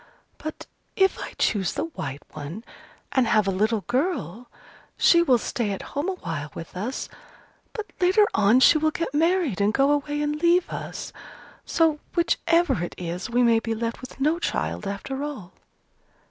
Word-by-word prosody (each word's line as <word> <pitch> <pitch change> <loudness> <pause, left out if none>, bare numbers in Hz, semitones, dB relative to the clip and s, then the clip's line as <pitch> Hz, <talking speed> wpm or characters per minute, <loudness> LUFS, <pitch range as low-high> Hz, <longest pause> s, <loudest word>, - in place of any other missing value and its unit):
But 310 - -6 0.3
if 385 0 +3
I - - -6
choose 195 -4 +1
the - - -2
white 140 - -6
one, 155 +9 -7 0.5
and 260 -3 +2
have 215 -2 +3
a - - +2
little 215 +3 +1
girl, 245 - -2 0.5
she 340 - +6
will 265 -8 +4
stay 235 -2 -2
at 195 - -6
home 290 +6 -1
awhile 165 - -4
with 165 - -8
us, 220 +9 -3 0.6
but 430 -2 -7
later 375 +4 +5
on 215 +5 +4
she 310 - +7
will 315 +1 +2
get 320 -2 -3
married 320 - +2
and 205 +1 +3
go 275 +5 +3
away 290 0 0
and 300 +1 -2
leave 345 +1 +4
us. - - -6 0.5
So, 320 -2 +2 0.2
whichever 335 - +2
it 175 - -5
is, 175 +3 -4
we 245 +1 +2
may 230 -1 +5
be 225 0 -3
left 230 +1 -3
with 255 +1 -11
no 305 +5 +2
child 210 - -2
after 265 +8 -4
all." 260 -12 -6
260 Hz, 170 wpm, -25 LUFS, 205-320 Hz, 0.6 s, she